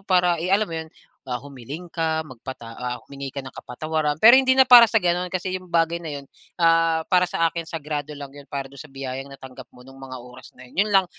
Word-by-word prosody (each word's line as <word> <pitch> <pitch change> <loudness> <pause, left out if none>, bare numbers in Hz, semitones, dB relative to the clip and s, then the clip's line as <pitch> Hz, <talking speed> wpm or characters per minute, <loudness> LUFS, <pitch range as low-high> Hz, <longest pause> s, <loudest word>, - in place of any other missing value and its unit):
para 180 -3 +2
i 175 - -2
alam 200 +3 +3
mo 170 - -10
'yun, 160 0 -5 0.4
ah, 125 -2 -4
humiling 140 +5 -9
ka, 160 -1 0
magpata 125 -3 -9
ah, 125 0 -4
humingi 140 0 -7
ka 140 - -4
ng 130 - -9
kapatawaran, 155 +3 -3
pero 235 +4 +9
hindi 260 -1 +3
na 265 -1 +6
para 245 -2 +11
sa 225 +1 +2
gano'n 180 0 0
kasi 185 0 -2
yung 185 -1 -11
bagay 165 0 +2
na 160 -3 -6
'yun, 140 - -15 0.4
ah, 165 -1 +4
para 180 0 +4
sa 165 0 +1
akin 170 0 -5
sagrado 150 -2 -4
lang 140 -1 -8
'yun 145 0 -12
para 135 -1 -5
do'n 140 0 -13
sa 155 -3 -12
biyayang 135 0 -6
natanggap 130 -1 -11
mo 125 - -17
nung 135 +1 -15
mga 130 -1 -8
oras 125 +1 -14
na 130 - -13
'yun. 195 +10 +1
'Yun - - -5
lang, 195 -1 +5
155 Hz, 240 wpm, -23 LUFS, 135-180 Hz, 0.4 s, para